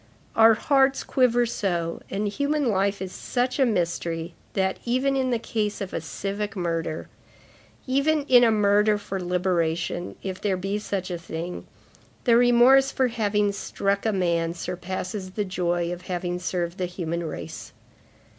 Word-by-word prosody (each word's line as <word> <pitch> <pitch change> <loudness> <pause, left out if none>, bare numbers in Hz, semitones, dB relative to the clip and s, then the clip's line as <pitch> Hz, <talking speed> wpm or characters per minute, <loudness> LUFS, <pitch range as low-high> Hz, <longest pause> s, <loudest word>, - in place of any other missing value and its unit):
Our 225 0 +7
hearts 270 +3 +2
quiver 245 -2 +3
so, 175 -7 -2
and 205 +2 -1
human 285 +5 0
life 200 -1 0
is 185 - -6
such 250 +6 -2
a 265 - +5
mystery 170 -4 -1 0.2
that, 190 -1 0
even 255 +3 +1
in 260 -1 +1
the 240 - +2
case 215 -2 -2
of 195 -2 -5
a - - -2
civic 200 +5 -4
murder, 165 -3 -2 0.8
even 280 +3 +2
in 250 -3 +6
a 235 - +6
murder 210 0 +3
for 195 -2 -5
liberation, 175 -1 -1
if 190 -1 -5
there 195 -3 0
be 195 +3 -2
such 195 -3 -3
a 175 - -3
thing, 170 +1 -6 0.6
the 235 -3 +5
remorse 245 +3 +6
for 260 -1 +1
having 210 -3 +1
struck 200 0 -1
a - - +3
man 170 -3 0
surpasses 185 +2 -5
the 210 0 -1
joy 175 -2 -1
of 175 - -8
having 180 -1 -2
served 175 -1 -3
the 180 - 0
human 170 -1 -3
race." 160 - -7
195 Hz, 155 wpm, -25 LUFS, 175-235 Hz, 0.8 s, Our